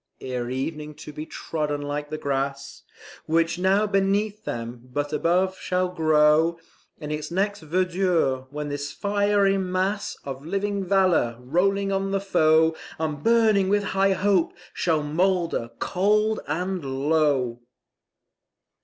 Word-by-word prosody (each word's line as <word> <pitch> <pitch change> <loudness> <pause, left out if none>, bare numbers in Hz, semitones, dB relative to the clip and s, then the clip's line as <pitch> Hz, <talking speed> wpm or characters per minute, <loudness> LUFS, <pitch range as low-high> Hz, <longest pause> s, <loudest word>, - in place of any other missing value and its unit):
Ere 125 -2 -4
evening 150 +3 -4
to 150 - -10
be 155 +2 -7
trodden 150 -2 -3
like 145 +1 -4
the 155 - -4
grass 140 -1 -3 0.5
Which 165 +2 +1
now 195 +3 +3
beneath 205 +2 0
them, 120 +1 -6
but 145 +3 -2
above 180 +4 +1
shall 180 0 0
grow 155 0 +3 0.4
In 150 -1 -6
its 150 0 -4
next 200 +3 -1
verdure, 170 -5 0
when 150 +1 -5
this 145 0 -4
fiery 200 0 +2
mass 190 +2 -1
Of 135 0 -6
living 200 +4 -2
valour, 185 -11 +2
rolling 195 +9 +1
on 195 0 0
the 195 0 0
foe 160 -4 +3 0.2
And 155 -2 -3
burning 220 -4 +4
with 205 0 +2
high 195 0 +3
hope, 190 -3 +2 0.2
shall 160 -4 0
moulder 170 -4 0
cold 210 +3 +1
and 180 +3 -2
low. 135 -3 +1
165 Hz, 130 wpm, -24 LUFS, 145-195 Hz, 0.5 s, burning